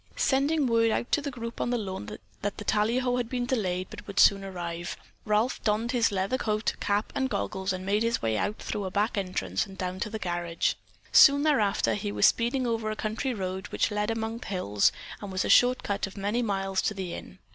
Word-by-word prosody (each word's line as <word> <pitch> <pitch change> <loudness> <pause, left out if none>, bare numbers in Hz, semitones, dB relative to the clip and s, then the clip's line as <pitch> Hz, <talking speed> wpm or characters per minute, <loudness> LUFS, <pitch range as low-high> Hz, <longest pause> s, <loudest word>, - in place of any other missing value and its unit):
Sending 285 +2 +2
word 230 -2 +3
out 235 - -1
to 295 - +3
the 285 - -3
group 235 -3 -6
on - - 0
the 245 - +1
lawn 190 - -5 0.3
that 205 0 -3
the 210 - -7
tallyho 245 +5 +1
had 240 -2 -2
been 250 -2 -1
delayed 185 -8 -1
but 220 - -10
would 200 - -2
soon 195 -1 +6
arrive, 175 -2 -5 0.3
Ralph 215 +4 +1
donned 220 +3 +1
his 235 -4 +2
leather 195 +6 0
coat, 215 0 0
cap 205 +1 0
and 265 -1 0
goggles 190 -5 -2
and 185 0 -4
made 205 +2 +1
his 230 +1 +1
way 110 -1 0
out 205 - -1
through 205 - -4
a - - -2
back 205 +4 0
entrance 140 - -1
and 190 -1 -12
down 185 0 -3
to 210 - -2
the 220 - -4
garage. 175 -3 -1 0.4
Soon 280 +1 +7
thereafter 210 - +2
he 105 -1 -3
was 105 0 +3
speeding 250 +3 +2
over 225 -2 -1
a 215 - -2
country 225 +5 -2
road 190 -1 -4
which - - 0
led 210 +1 -1
among 225 0 -2
the - - -9
hills 105 - +2 0.3
and 205 -2 -6
was 185 -1 -1
a - - -2
short 250 +1 +5
cut 200 -1 -1
of 195 - -12
many 205 +5 0
miles 195 -3 0
to 210 - -1
the 185 -3 -4
Inn. - - -9
210 Hz, 225 wpm, -28 LUFS, 190-235 Hz, 0.4 s, Soon